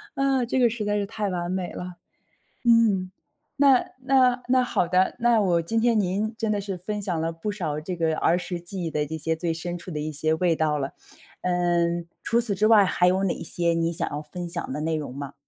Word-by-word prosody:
啊， 270 -2 +1
这 260 +2 0
个 240 -2 +5
实 220 -2 -4
在 205 0 0
是 205 -1 0
太 210 -1 -3
完 175 -1 -3
美 185 -1 -3
了。 180 0 -7 0.7
嗯， 215 -6 +3 0.5
那 275 -3 +5 0.2
那 255 -2 +3
那 255 0 +4
好 175 -7 0
的， 185 +1 +2
那 235 -2 +4
我 175 -4 +2
今 225 +7 0
天 230 -1 +3
您 205 +4 -1
真 220 -2 -1
的 205 -1 0
是 195 -2 -4
分 210 +4 -4
享 175 -5 -2
了 165 +1 -1
不 165 +6 -4
少 155 -7 -3
这 180 +4 -4
个 160 -2 0
儿 170 - +3
时 180 -1 -4
记 180 +1 -6
忆 165 - -2
的 150 -1 0
一 160 +2 -5
些 160 +1 -1
最 165 0 -2
深 175 +1 -4
处 175 0 -8
的 150 - -3
一 155 +1 -3
些 155 +2 0
味 170 -1 +1
道 155 -1 +1
了， 135 0 -4 0.5
嗯， 175 -1 +1 0.2
除 235 +1 +2
此 210 -5 -2
之 215 +2 +3
外， 215 -3 +7
还 180 -1 +2
有 185 +2 +3
哪 190 - -1
些 170 -1 -1
你 165 0 0
想 - - -1
要 145 - -4
分 175 +3 -7
享 165 - -4
的 150 - -3
内 160 0 0
容 145 -4 -5
吗？ 140 0 -7
180 Hz, 250 characters per minute, -25 LUFS, 165-215 Hz, 0.7 s, 外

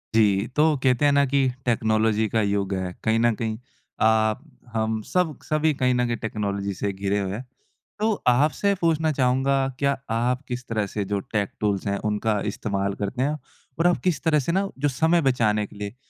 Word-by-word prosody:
जी, 105 -1 +3
तो 155 0 +4
कहते 130 +2 +3
हैं 145 - +5
ना 140 0 +4
कि 135 0 +2 0.2
टेक्नोलॉजी 110 -1 +2
का 110 - +1
युग 100 -1 0
है। 95 -1 -3
कहीं 110 0 +2
न 120 0 +3
कहीं 110 -1 -3 0.4
आप, 110 +1 +3 0.3
हम, 110 -1 -1
सब 180 - 0
क - - -21
सभी 155 0 +1
कहीं 125 -2 +1
न 125 0 +1
कहीं 120 -1 -1
टेक्नोलॉजी 100 -2 -3
से 100 +2 -2
घिरे 100 +1 -1
हुए 95 -1 -2
हैं। 120 +6 -6 0.5
तो 220 +1 +2 0.2
आपसे 150 +10 +3
पूछना 160 -2 +2
चाहूँगा, 135 0 +1
क्या 140 0 +1
आप 120 +4 0
किस 125 0 -5
तरह 110 -2 -1
से 105 +1 -3
जो 100 +1 -1
टेक 105 -2 +1
टूल्स 100 -2 -1
हैं, 100 0 0
उनका 105 0 0
इस्तेमाल 100 -2 -2
करते 110 +6 -2
हैं? 150 +2 0 0.4
और 170 - +4
आप 175 - +3
किस 170 -6 0
तरह 155 -2 +3
से 145 +4 -1
ना, 195 +3 0
जो 145 - +2
समय 160 +6 +2
बचाने 110 -6 +2
के - - -17
लिए, 105 +2 -6
115 Hz, 200 wpm, -24 LUFS, 105-140 Hz, 0.5 s, हैं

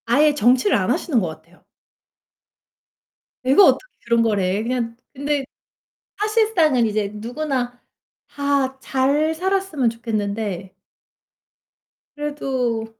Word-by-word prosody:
아예 290 +6 +4
정치를 250 - +3
안 - - -1
하시는 280 -9 +1
것 185 - -1
같아요. 165 +2 -12 1.8
"내가 270 +10 +6
어떻게 - - +2
그런 235 0 +3
걸 220 -3 +1
해." 190 +2 0
그냥 235 -1 -2 0.2
근데 285 0 -1 0.7
사실상은 420 - +2
이제 210 -2 -1
누구나 245 +2 -3 0.5
다 280 -2 -1
잘 280 +5 +1
살았으면 370 -7 0
좋겠는데. 205 -4 -3 1.4
그래도 265 -6 -2
255 Hz, 220 characters per minute, -21 LUFS, 225-295 Hz, 1.8 s, 내가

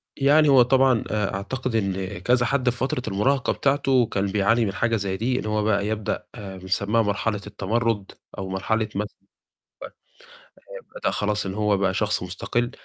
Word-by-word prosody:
يعني 145 +2 +4
هو 135 -2 +7
طبعًا 130 -1 +4
آآ، 105 -3 -1
أعتقد 120 +5 -3
إن 95 -2 -2
كذا 125 +5 +2
حد 130 -1 +1
في 120 - -3
فترة 130 0 -1
المُراهقة 130 +7 +1
بتاعته، 135 -3 +2
كان 100 -2 -1
بيعاني 105 +4 +2
من 100 - -2
حاجة 115 +3 +1
زي 100 -2 -2
دي، 125 +4 0
إن - - -5
هو 105 0 0
بقى 105 -1 +1
يبدأ 110 -1 -2
بنسميها 100 +2 -1
مرحلة 105 0 -1
التمرُد، 105 +1 -1 0.3
أو 95 -1 -5
مرحلة 110 +3 -1
مث 105 +1 -1 1.7
آآ - - -7 0.2
بدأ - - +1
خلاص 105 -1 -1
إن 95 - -4
هو 105 -1 +2
بقى 95 -1 0
شخص 105 -2 0
مُستقل، 120 +7 -2
105 Hz, 170 wpm, -24 LUFS, 100-125 Hz, 1.7 s, هو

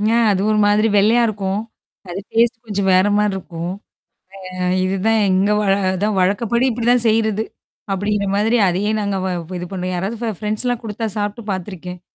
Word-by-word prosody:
ஆ - - +4
அது 190 -1 0
ஒரு 215 - +2
மாதிரி 210 +2 +3
வெள்ளையா 225 +4 +4
இருக்கும். 200 -2 -2 0.5
அது 175 +2 -4
டேஸ்ட் 230 0 +2
கொஞ்சம் 200 -3 -1
வேறமாரி 205 +2 +3
இருக்கும். 170 -2 -5 0.8
அ - - -8 0.3
இதுதான் 195 +4 +1
எங்க 190 +2 +2
வழ 200 -2 +2 0.5
வழக்கப்படி 220 +6 +1
இப்பிடிதான் 240 0 +2
செய்யிறது. 220 -1 +2 0.5
அப்பிடிங்கிற 200 +1 0
மாதிரி 220 +4 +2
அதையே 190 +4 0
நாங்க 200 -1 -1
வ - - -1 0.3
இது 180 - -5
பண்ணுவோம். 185 -1 -3
யாராவது 195 +6 -3
ஃபெ 230 - -1
ஃப்ரெண்ட்ஸ்லாம் 220 +3 -2
குடுத்தா 225 +1 -3
சாப்ட்டு 210 +2 -3
பாத்துருக்கேன். 180 -1 -6
205 Hz, 155 wpm, -19 LUFS, 190-225 Hz, 0.8 s, ஆ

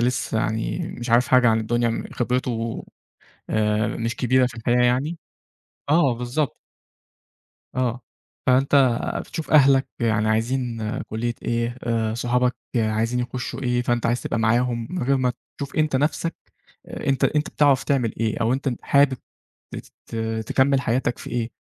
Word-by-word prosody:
لسّه 120 -2 0
يعني 110 +9 -1 0.2
مش 120 0 -5
عارف 120 +1 +4
حاجة 125 -2 +5
عن 110 0 +3
الدنيا 120 +2 0
م 115 - -2
خِبرِتُه 120 -2 -2 0.7
آآ 105 0 +1
مش 115 +1 -3
كبيرة 130 0 +3
في 125 - -7
الحياة 120 +2 +2
يعني 140 +7 +1 0.7
آه 150 -5 +4
بالضبط. 125 +4 -2 1.2
آه. 125 -1 0 0.5
فأنت 130 +2 +3 0.5
بتشوف 160 - -6
أهلك 135 -3 +5
يعني 110 -2 +1
عايزين 115 +2 0 0.2
كُلّية 115 +2 -3
إيه، 120 +1 -1
أ 115 -2 0
صحابك 125 +1 +1 0.2
عايزين 115 +2 +1
يخُشّوا 125 +2 -4
إيه؟ 125 -1 +1
فأنت 120 -1 0
عايز 120 +1 0
تبقى - - -2
معاهم 115 +1 +1
من 180 -6 -3
غير 135 +2 +2
ما 125 -1 +1 0.3
تشوف 140 -1 -6
أنت 155 -3 +2
نفسَك 155 +4 -1 0.5
أنت 135 -1 -1
أنت 150 0 +1
بتعرف 140 -3 +3
تعمل 125 -6 +1
إيه 110 -1 0
أو 115 +2 +2
أنت 135 0 -1
حابب 140 -2 +3 0.6
تت - - -11 0.3
تكمّل 135 0 +3
حياتك 125 0 0
في - - -8
إيه؟ 120 -1 -2
125 Hz, 145 wpm, -23 LUFS, 115-130 Hz, 1.2 s, حاجة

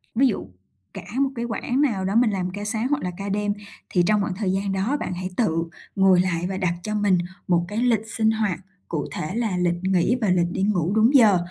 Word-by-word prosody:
ví 265 +4 +5
dụ 220 - -2 0.5
cả - - -7 0.2
một 275 -1 +3
cái 235 0 -3
quãng 245 +3 -1
nào 215 -10 +1
đó 195 +2 -1
mình 235 0 +5
làm 185 -2 -2
ca 205 +3 -6
sáng 220 +3 -1
hoặc 290 +1 -1
là 180 - -2
ca 200 0 -4
đêm 205 +1 0 0.4
thì 180 - +2
trong 210 0 +3
khoảng 195 -2 -2
thời 195 -1 -1
gian 195 +1 -1
đó 195 +9 0
bạn - - -3
hãy 185 +1 -4
tự 165 -9 +1 0.3
ngồi 190 -2 +5
lại 175 -2 -1
và 190 - -3
đặt 180 -3 0
cho 215 0 -3
mình 205 -3 +3 0.3
một 175 -1 +2
cái 205 +3 -5
lịch 230 -2 +1
sinh 220 -1 +3
hoạt 210 -7 -1 0.3
cụ 155 -4 -2
thể 155 +6 -4
là 225 -6 -1
lịch 175 -1 +1
nghỉ 190 +4 +2
và 215 - +1
lịch 175 -1 +2
đi 190 - -2
ngủ 190 -3 +1
đúng 225 +6 +4
giờ. 215 -7 +7
200 Hz, 245 wpm, -23 LUFS, 180-220 Hz, 0.5 s, giờ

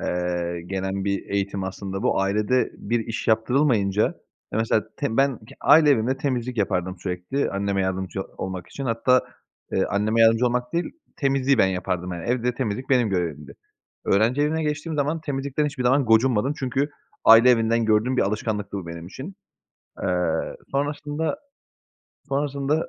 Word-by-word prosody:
eee, 85 -1 -2
gelen 95 +1 -3
bir 100 0 -2
eğitim 100 -1 -1
aslında 95 0 -5
bu. - - +2
Ailede 105 +6 +1
bir 115 +2 -1
iş 115 0 -4
yaptırılmayınca, 110 -3 +2 0.5
ya, 110 - 0
mesela 110 -1 +1
te 135 -6 -2
ben 135 -3 +2
k 110 - -15
aile 150 -2 +6
evimde 130 +1 +2
temizlik 125 -3 -2
yapardım 95 -2 -1
sürekli 90 +10 -2
anneme 100 0 -1
yardımcı 95 0 -2 0.2
olmak 95 -2 -5
için. 140 - -6
Hatta, 125 +2 +3 0.5
eee, - - +2
anneme 110 +3 0
yardımcı 115 +2 +5
olmak 125 0 -1
değil, 170 +1 -1 0.2
temizliği 135 -2 +2
ben 95 - +5
yapardım, 90 -1 -2
yani, 85 -1 -6
evde 125 0 0
temizlik 125 -1 -3
benim 125 -4 +4
görevimdi. 80 -6 -3 0.5
Öğrenci 115 +8 +2
evine 160 +2 0
geçtiğim 150 +1 -2
zaman 150 +3 0
temizlikten 140 0 -2
hiçbir 140 -3 -4
zaman 130 +2 +3
gocunmadım 120 +3 +3
çünkü 135 +1 -1 0.3
aile 115 +3 +8
evinden 115 -1 +2
gördüğüm 110 +4 +2
bir - - +3
alışkanlıktı 105 0 -2
bu 90 - -8
benim 85 0 -7
için. 140 - -8 0.7
Iıı, 90 -3 -1
sonrasında, 145 - -2 0.9
sonrasında, 140 +2 -1
115 Hz, 150 wpm, -24 LUFS, 95-135 Hz, 0.9 s, aile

